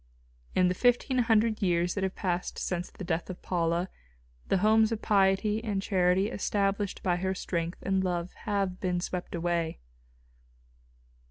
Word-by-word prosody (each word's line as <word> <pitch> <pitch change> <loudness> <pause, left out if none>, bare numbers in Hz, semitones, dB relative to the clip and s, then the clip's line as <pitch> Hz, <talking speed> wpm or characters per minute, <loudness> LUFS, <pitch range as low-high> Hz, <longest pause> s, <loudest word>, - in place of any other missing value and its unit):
In 185 - +4
the 180 - +2
fifteen 245 +4 +2
hundred 225 -2 +2
years 175 -2 +2
that 200 - -2
have 190 0 -1
passed 180 -2 -2
since 180 -1 -2
the - - -9
death 170 0 -2
of 185 - -6
Paula, 170 0 0 0.6
the - - +2
homes 220 +3 +4
of 225 - -1
piety 205 +2 +2
and 205 -4 -1
charity 190 +1 +2
established 200 -1 -1
by 180 -2 +2
her 190 +1 -1
strength 170 -2 -3
and 190 -1 +1
love 175 -1 -2
have 195 -3 -2
been 180 -2 0
swept 180 0 -4
away. 170 -1 -1
190 Hz, 155 wpm, -29 LUFS, 175-205 Hz, 0.6 s, In